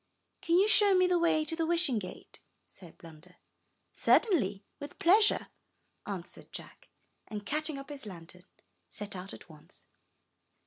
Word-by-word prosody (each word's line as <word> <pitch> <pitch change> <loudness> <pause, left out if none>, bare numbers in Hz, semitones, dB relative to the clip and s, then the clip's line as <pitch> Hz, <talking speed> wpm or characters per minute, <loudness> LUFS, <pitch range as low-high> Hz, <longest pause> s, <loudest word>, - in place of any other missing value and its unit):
''Can 335 - +1
you 395 +3 +5
show 415 -2 +6
me 365 0 +5
the 360 -1 +2
way 315 -2 +2
to 325 - -1
the 325 -1 -1
Wishing 335 -9 +2
Gate?" 185 - -10 0.2
said 175 -4 -10
Blunder. 165 +2 -15 0.6
''Certainly, 210 - +2
with 285 0 -9
pleasure," 415 +5 +4 0.6
answered 190 -3 -7
Jack, - - -9 0.4
and, 210 -1 -6
catching 305 +3 -2
up 275 +1 -9
his 275 -6 -8
lantern, 180 -1 -11 0.4
set 205 -1 -6
out 185 +1 -7
at - - -10
once. 155 -3 -12
275 Hz, 145 wpm, -31 LUFS, -, 0.6 s, show